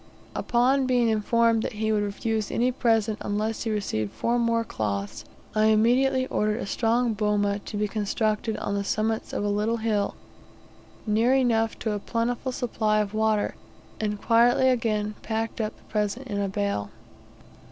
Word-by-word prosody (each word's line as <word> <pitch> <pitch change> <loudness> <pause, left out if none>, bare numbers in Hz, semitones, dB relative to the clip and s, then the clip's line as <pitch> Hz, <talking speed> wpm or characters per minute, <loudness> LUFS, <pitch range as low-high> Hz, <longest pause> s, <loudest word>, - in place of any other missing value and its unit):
Upon 255 +2 +2
being 245 -2 +3
informed 225 +1 +2
that - - -3
he 220 +1 -1
would 210 -1 +2
refuse 215 +1 -2
any 245 +2 +1
present, 225 -3 +1
unless 215 +2 -2
he - - 0
received 150 - -2
four 235 - 0
more 230 -1 +1
cloths, 100 - -4 0.3
I 215 0 +3
immediately 250 +5 +3
ordered 215 -4 0
a - - -3
strong 230 +3 +1
boma 205 -1 +1
to 205 - -7
be 210 0 0
constructed 215 +1 -1
on 205 - -3
the 200 0 -1
summits 220 +2 -1
of - - -2
a - - 0
little 210 +3 0
hill, 215 -3 0 0.9
near 225 +4 +3
enough 225 -4 +2
to 220 - -2
a 205 - -2
plentiful 235 +4 -2
supply 220 -4 0
of 210 -1 -1
water, 215 -1 +1 0.5
and 210 -1 -2
quietly 240 +3 +4
again 215 -4 0
packed 225 0 -3
up 215 0 -3
the - - -23
present 210 +4 -2
in 205 -5 -3
the 200 -1 -1
bale. 200 - -2
220 Hz, 165 wpm, -26 LUFS, 210-235 Hz, 0.9 s, quietly